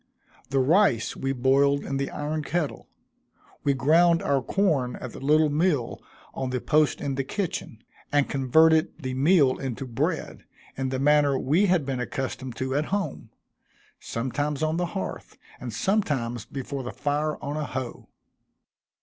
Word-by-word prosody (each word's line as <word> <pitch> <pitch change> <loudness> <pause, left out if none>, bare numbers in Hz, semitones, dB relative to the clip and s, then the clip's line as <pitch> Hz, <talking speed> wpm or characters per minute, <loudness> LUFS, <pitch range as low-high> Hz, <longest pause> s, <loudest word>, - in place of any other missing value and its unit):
The 135 - 0
rice 140 - +3
we 135 - -2
boiled 135 +2 +3
in 135 - -3
the 140 0 -2
iron 150 +1 -3
kettle 150 0 -3 0.8
we 140 -1 +2
ground 165 +5 +4
our 140 -1 +1
corn 140 -6 0
at 125 - -7
the - - -10
little 150 +2 +3
mill 150 -5 0 0.3
on 130 -1 -3
the 125 0 -1
post 155 +3 +2
in 140 - -2
the 135 0 -1
kitchen, 140 - -4 0.3
and 145 -1 +3
converted 160 +4 +3
the 130 -5 -5
meal 140 0 +3
into 135 -1 -4
bread, 115 -3 -2 0.3
in 135 0 -2
the 130 - -2
manner 145 0 +3
we 160 +11 +2
had 180 -6 +2
been 135 -2 -2
accustomed 130 0 -4
to 130 +2 -3
at 145 +2 +1
home 200 +2 -3 0.7
sometimes 140 +5 -2
on 155 +1 0
the 175 0 0
hearth, - - -6 0.2
and 125 - -6
sometimes 120 - -1
before 135 +2 -5
the 125 - -5
fire 150 +1 -1
on 145 +1 -4
a 155 -1 -2
hoe. 130 -3 -6
140 Hz, 160 wpm, -26 LUFS, 130-155 Hz, 0.8 s, ground